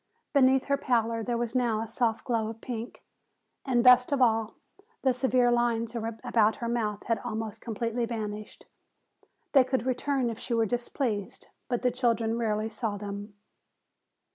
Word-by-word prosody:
Beneath 265 -2 +4
her 280 0 +1
pallor 230 -4 0
there 240 +1 -1
was 235 -1 -2
now 240 -4 +1
a 225 - -3
soft 230 +1 -1
glow 230 -3 0
of 225 0 -7
pink, 235 -1 -6 0.6
and 245 -3 +2
best 250 +1 +7
of 280 - +1
all, 225 -3 +2 0.5
the 260 -1 +4
severe 255 -1 +2
lines 235 -1 +1
about 225 -1 +1
her 235 - -4
mouth 220 -3 -1
had 230 -3 0
almost 220 -1 -5
completely 230 +1 -2
vanished. 215 -2 -6 0.9
They 270 -3 +6
could 255 -2 -1
return 260 -1 0
if 225 - -8
she 235 - -2
were 225 -1 +3
displeased, 240 -2 -3 0.2
but 245 0 -2
the 250 - +3
children 230 -2 +1
rarely 215 -1 0
saw 220 -1 -3
them. 200 0 -7
235 Hz, 160 wpm, -28 LUFS, 220-250 Hz, 0.9 s, best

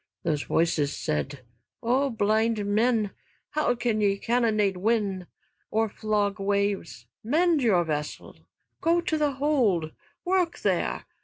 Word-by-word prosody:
Those 150 -3 0
voices 155 -3 0
said: 75 - -3 0.4
"O 260 +4 +2
blind 220 -1 +1
men! 215 0 +2 0.4
How 300 -4 +1
can 235 -3 0
ye 200 -1 +2
cannonade 215 -4 +1
wind, 200 -3 0 0.4
or 220 0 +1
flog 210 -1 -1
waves? 200 0 -1 0.2
Mend 315 +6 +2
your 200 -8 +3
vessel! 150 -2 -4 0.5
Go 335 +1 +3
to 340 -2 -1
the 300 -2 +1
hold. 245 - +1 0.3
Work 360 -2 +1
there. - - 0
215 Hz, 125 wpm, -26 LUFS, 195-250 Hz, 0.5 s, your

